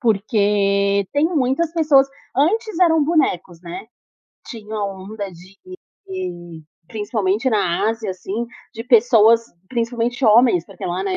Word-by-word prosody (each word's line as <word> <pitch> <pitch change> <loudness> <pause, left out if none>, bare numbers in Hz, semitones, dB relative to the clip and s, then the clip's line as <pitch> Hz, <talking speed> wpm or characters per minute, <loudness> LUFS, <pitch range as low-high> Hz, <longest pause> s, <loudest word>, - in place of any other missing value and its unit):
Porque 200 -3 +1
tem 290 +2 +2
muitas 315 0 0
pessoas 300 -5 +4 0.3
antes 420 +7 0
eram 325 -4 +4
bonecos, 190 - 0
né. 175 +4 -8 0.6
Tinha 220 -2 -8
a 210 -1 -2
onda 200 +1 -6
de 185 +2 -16 0.5
de, 175 - -7 0.2
principalmente 210 +2 -1
na 205 -4 +1
Ásia 225 -2 -3
assim, 195 +5 -5 0.3
de 225 0 -7
pessoas, 230 -2 +5 0.3
principalmente 240 +1 -2
homens, 220 -5 +4
porque 195 -3 -10
lá, 175 - -2
né, 385 -1 -2
220 Hz, 130 wpm, -20 LUFS, 195-270 Hz, 0.6 s, pessoas